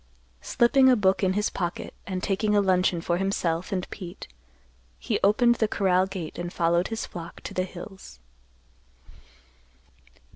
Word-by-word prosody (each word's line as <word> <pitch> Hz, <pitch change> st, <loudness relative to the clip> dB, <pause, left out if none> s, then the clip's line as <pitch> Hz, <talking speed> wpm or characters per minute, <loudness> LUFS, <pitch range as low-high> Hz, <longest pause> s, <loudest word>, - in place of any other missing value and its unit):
Slipping 260 Hz, +2 st, +4 dB
a 255 Hz, -, +6 dB
book 190 Hz, -3 st, +2 dB
in 185 Hz, 0 st, +2 dB
his 210 Hz, +2 st, 0 dB
pocket, 175 Hz, -2 st, -4 dB
and 185 Hz, -2 st, -4 dB
taking 210 Hz, +2 st, +1 dB
a -, -, +5 dB
luncheon 185 Hz, -3 st, +2 dB
for 175 Hz, 0 st, 0 dB
himself 180 Hz, -3 st, -1 dB
and 185 Hz, -2 st, -2 dB
Pete 180 Hz, -3 st, -8 dB, 0.7 s
he 60 Hz, -, -2 dB
opened 235 Hz, +4 st, +4 dB
the 220 Hz, -, +4 dB
corral 190 Hz, -3 st, +2 dB
gate 185 Hz, -5 st, -6 dB
and 175 Hz, 0 st, -4 dB
followed 170 Hz, +1 st, +1 dB
his 225 Hz, 0 st, -4 dB
flock 170 Hz, -1 st, -9 dB
to -, -, -7 dB
the 185 Hz, -, 0 dB
hills. 185 Hz, -, -11 dB
190 Hz, 150 wpm, -26 LUFS, 175-205 Hz, 0.7 s, a